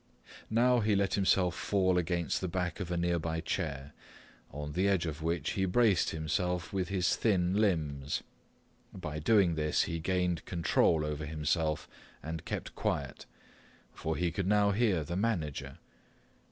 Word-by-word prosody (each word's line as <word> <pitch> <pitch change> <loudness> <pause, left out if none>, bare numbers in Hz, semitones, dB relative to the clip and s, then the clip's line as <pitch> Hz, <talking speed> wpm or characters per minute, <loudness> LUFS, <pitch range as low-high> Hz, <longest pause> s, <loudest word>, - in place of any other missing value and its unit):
Now 120 +2 +4
he 105 -2 +2
let 100 -1 +1
himself 95 -2 +3
fall 95 -2 +1
against 85 -2 -1
the 95 - -1
back 90 +1 -2
of 90 -3 -4
a 90 - -1
nearby 85 -2 0
chair, 75 -5 -3 0.6
on 75 +1 -5
the 90 +6 +1
edge 95 -4 +2
of 80 -1 -4
which 80 -3 -1
he 95 - 0
braced 105 0 +3
himself 85 +3 -2
with 95 -2 -1
his 95 -3 +1
thin 95 -5 +1
limbs. 75 -9 0 0.7
By 75 -5 -5
doing 95 +1 +4
this 75 -1 +1
he 85 -1 -3
gained 90 -1 0
control 85 -2 +2
over 75 0 -3
himself 75 0 -1 0.4
and 80 0 -5
kept - - -4
quiet, - - -3 0.7
for 80 0 -3
he 90 -1 0
could 95 0 -2
now 105 0 +4
hear 100 -6 +2
the 85 +4 -4
manager. 75 -9 -2
85 Hz, 155 wpm, -31 LUFS, 80-95 Hz, 0.7 s, Now